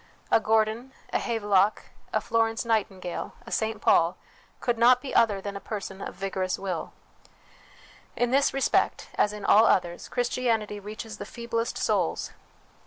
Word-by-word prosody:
A - - +6
Gordon, 220 +4 +1 0.2
a - - +2
Havelock, 205 -3 +2 0.3
a - - +2
Flor 225 -1 +2
ence 225 +1 -4
Nightingale, 195 -6 -2
a 235 - -10
St 220 -1 -1
Paul, 170 -3 +3 0.4
could 240 -2 -1
not 245 +1 +6
be 265 +1 -7
other 205 -4 +3
than 200 0 -5
a - - -4
person 195 -2 -6
of - - -6
vigorous 190 -1 -2
will. 185 -4 -4 1.2
In 245 0 0
this 275 +1 +3
respect, 270 -1 +1
as 210 - +2
in 210 -1 -7
all 220 +2 +6
others, 175 -1 +1
Christianity 235 -4 -1
reaches 215 +2 -8
the - - -4
feeblest 235 0 -3
souls. - - 0
220 Hz, 155 wpm, -27 LUFS, 200-235 Hz, 1.2 s, A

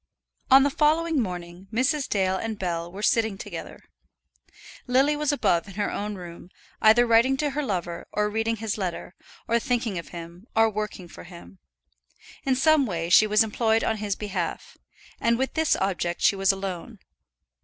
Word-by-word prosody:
On 270 0 +8
the 285 - +1
following 315 0 +2
morning 180 -2 -6
Mrs. 260 +5 0
Dale 190 -2 +1
and 220 +2 -4
Bell 170 -2 -3
were 200 +3 -8
sitting 220 -3 +2
together. - - -8 1.1
Lily 270 +4 +3
was 300 0 0
above 210 -10 +1
in 195 - -11
her 205 0 -1
own 210 0 -4
room, 175 -1 -10 0.3
either 220 +3 +6
writing 235 +3 +4
to 295 0 -1
her 295 +2 -2
lover, 175 - -4
or 210 0 0
reading 225 +2 -1
his 220 -1 -4
letter, 180 -1 -4 0.3
or 235 +1 +2
thinking 230 -6 -1
of 170 - -9
him, 170 +4 -10
or 225 0 +4
working 210 -3 -5
for - - -12
him. 165 - -13 0.9
In 265 - +3
some 295 0 +3
way 170 -3 -3
she 215 +4 +7
was 210 +1 +4
employed 220 +1 +1
on 220 - 0
his 205 -2 -2
behalf, 190 -5 -4 0.4
and 235 0 +2
with 265 +1 -2
this 320 -1 +2
object 175 -3 -2
she - - +4
was 195 0 +3
alone. 195 +3 -6
215 Hz, 175 wpm, -25 LUFS, 185-245 Hz, 1.1 s, On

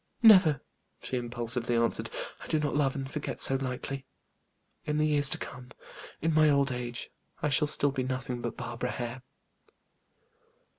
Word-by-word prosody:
"Never!" 185 - +7 0.4
she - - -4
impulsively 120 0 -1
answered. 115 0 0 0.3
"I - - -10
do 155 - +1
not 150 -1 -1
love 140 -2 +1
and 135 -1 -4
forget 150 - -4
so - - +7
lightly. 135 +1 -5 0.8
In 150 -1 -2
the 155 - +2
years 145 -2 +4
to - - -1
come, 125 0 -9 0.5
in 165 0 +2
my 155 0 +5
old 140 -1 +3
age, 120 -1 -4 0.3
I 150 - +2
shall 150 +2 +3
still 145 -1 +2
be 135 -1 -2
nothing 130 -1 -3
but 120 - -4
Barbara 125 0 -4
Hare." 120 +1 -5
135 Hz, 160 wpm, -29 LUFS, 125-150 Hz, 0.8 s, Never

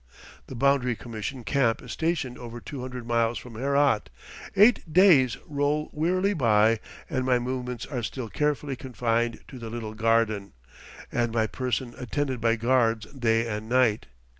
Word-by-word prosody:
The 130 - -8
Boundary 125 -1 +2
Commission 115 +3 -6
camp 120 -3 +1
is - - -8
stationed 160 -6 -2
over 120 -1 -8
two 140 +1 -7
hundred 125 -1 -6
miles 115 0 +1
from 125 - -9
Herat; 140 - +1 0.5
eight 205 -4 +5
days 155 - +5
roll 145 +1 -1
wearily 185 +6 +1
by 115 - +3 0.3
and 130 -3 -1
my 125 -1 +3
movements 125 -1 -4
are 130 -4 -4
still 120 +1 -4
carefully 150 +2 -1
confined 120 -2 -1
to 130 - -10
the 115 -1 -6
little 110 -2 -5
garden, 110 -2 +1 0.6
and 120 -1 0
my 110 -1 +1
person 125 +1 -3
attended 130 0 -2
by 115 0 +3
guards 115 -2 +2
day 115 -3 +1
and 110 0 -4
night. 125 -4 +2
125 Hz, 155 wpm, -26 LUFS, 115-140 Hz, 0.6 s, eight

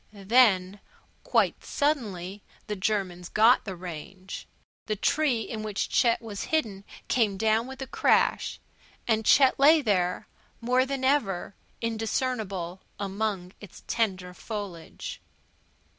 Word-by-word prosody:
Then, 200 -2 +3 0.4
quite - - +1
suddenly, 210 - -2 0.2
the 210 - -3
Germans 185 -3 -2
got 225 +4 +5
the 195 -3 -5
range. 180 +2 -8 0.4
The 215 - 0
tree 280 +1 +1
in 220 -1 -5
which 210 -2 -2
Chet 235 0 +2
was 210 -3 -5
hidden 215 -11 -1 0.2
came 215 -6 +1
down 220 +3 +2
with 265 0 -7
a - - -5
crash, - - +1 0.5
and 220 -1 +2
Chet 265 +4 +5
lay 300 +2 +6
there, 180 -5 0 0.3
more 250 +2 +2
than 275 -1 -3
ever 215 -9 +1 0.3
indiscernible 220 -5 -2 0.2
among 200 -2 -3
its 205 -4 -12
tender 190 -6 -1
foliage. 200 -5 -7
215 Hz, 120 wpm, -27 LUFS, 190-245 Hz, 0.5 s, lay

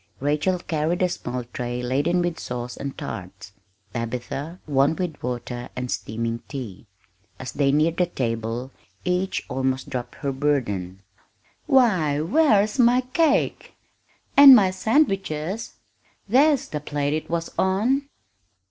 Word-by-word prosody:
Rachel 150 +6 +1
carried 165 +1 -1
a 180 - +2
small 125 -6 -4
tray 125 0 -3
laden 145 +8 +1
with 175 -2 -2
sauce 125 0 -5
and 140 -1 -6
tarts; 95 -2 -7 0.4
Tabitha, 125 +8 -4
one 140 +1 +2
with 175 -4 -4
water 120 0 -5
and 125 -1 -4
steaming 115 +1 -3
tea. 120 -7 -7 0.5
As 130 -2 -6
they 140 -1 +1
neared 155 +3 +2
the 180 - +2
table 115 -3 -3 0.3
each 180 +1 -1
almost 130 0 -2
dropped 120 -2 -5
her 140 -2 -3
burden. 105 -10 -1 0.6
"Why, 190 - +3
where's 210 - +3
my 245 +1 +5
cake?" 320 -3 +1 0.6
"And 280 -2 +11
my 195 -5 +4
sandwiches?" 195 - 0 0.5
"There's 275 +5 +4
the 150 - -3
plate 145 0 -2
it 155 - -3
was 170 0 -2
on!" 240 +10 +1
150 Hz, 130 wpm, -24 LUFS, 125-190 Hz, 0.6 s, And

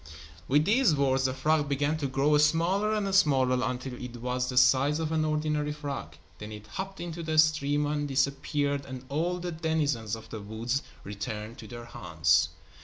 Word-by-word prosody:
With 145 +3 +3
these 220 - +4
words, 135 -1 +2
the 130 - +1
frog 150 +1 +1
began 145 +2 +1
to 145 -3 -2
grow 135 +3 +2
smaller 170 +8 +2
and 205 -2 -1
smaller 130 -8 +3
until 130 0 -3
it 125 -1 -7
was 125 +1 -2
the 125 - -4
size 135 +3 +5
of 160 -1 -2
an 160 -1 +1
ordinary 150 -1 0
frog. 140 - -6 0.2
Then 105 +1 -7
it 105 0 -9
hopped 190 - -6
into 170 -1 -6
a 155 - 0
stream 150 -2 +3
and 145 0 -1
disappeared 140 +1 0
and 130 -1 -8
all 170 +5 0
the 180 0 -4
denizens 150 - -1
of 110 - -12
the 110 - -6
woods 115 +6 -2 0.2
returned 105 +2 -6
to 110 - -9
their 120 +2 -8
haunts. 85 -9 +1
140 Hz, 180 wpm, -28 LUFS, 125-155 Hz, 0.2 s, size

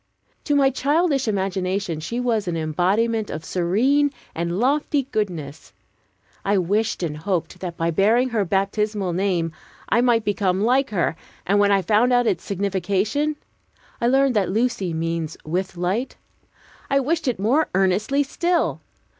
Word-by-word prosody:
To 290 - +1
my 275 -1 +4
childish 285 0 +1
imagination 190 -3 -1
she 230 +10 -4
was 230 -5 0
an 170 -1 -1
embodiment 200 +8 0
of 155 +1 -6
serene 240 +12 +2 0.2
and 170 +2 -2
lofty 285 +3 +1
goodness. 160 -9 -4 0.7
I 200 +1 +2
wished 205 +3 0
and 150 -3 -3
hoped 180 +1 -3
that 175 -2 -6
by 165 0 0
bearing 225 +9 +3
her 225 -4 0
baptismal 195 0 -1
name 175 -3 0 0.4
I 235 - +3
might 235 -3 +2
become 195 -3 0
like 260 +4 +2
her; 175 -5 0 0.3
and 200 +2 +2
when 205 0 +4
I 195 -1 +3
found 220 +7 +3
out 245 0 +3
its 180 -6 0
signification 200 +9 -1 0.7
(I 235 - +2
learned 270 0 +3
that 195 -4 +2
"Lucy" 210 -3 0
means 165 -1 -3
"with 180 +3 -3
light"), 190 +9 -1 0.7
I 275 - +3
wished 310 +3 -1
it 250 - +1
more 250 +11 +2
earnestly 195 +9 +2
still. 345 +5 0
205 Hz, 150 wpm, -22 LUFS, 180-245 Hz, 0.7 s, my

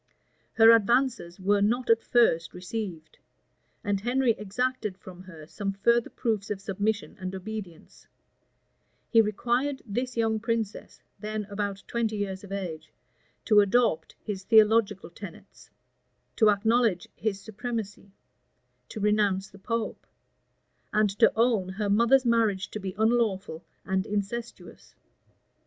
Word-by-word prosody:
Her 225 0 +7
advances 230 -4 +2
were 200 +2 +2
not 240 +5 +1
at 230 0 +4
first 195 -9 +2
received; 180 -3 -6 0.6
and 200 -1 -1
Henry 245 +2 +2
exacted 215 0 -2
from 185 -1 -12
her 165 -5 -12
some 195 +4 -4
further 235 +4 +2
proofs 220 -3 -2
of 205 -2 -3
submission 200 +2 -2
and 185 0 -5
obedience: 190 -3 -8 1.0
he 230 - +7
required 240 +6 -1
this 245 +3 -3
young 220 -1 +1
princess, 225 -2 -4 0.2
then 215 0 -4
about 200 -1 -3
twenty 230 -2 -1
years 195 -1 -4
of 200 - -11
age, 170 -5 -5 0.5
to 210 -3 +5
adopt 200 -5 +2
his 205 -3 -4
theological 215 -3 +3
tenets; 185 -1 -12 0.7
to 220 -2 +5
acknowledge 220 -2 +2
his 205 -2 -2
supremacy; 215 -1 -6 0.8
to 220 - -7
renounce 205 -2 +1
the 195 - -15
pope; 230 +2 -4 0.8
and 210 -1 +2
to 230 - +6
own 225 -5 +2
her 200 +2 -2
mother's 235 +5 +4
marriage 220 -5 +1
to 215 - -5
be 190 -2 -6
unlawful 215 -6 0 0.2
and 190 0 -1
incestuous. 210 +3 -5
210 Hz, 125 wpm, -27 LUFS, 195-230 Hz, 1.0 s, Her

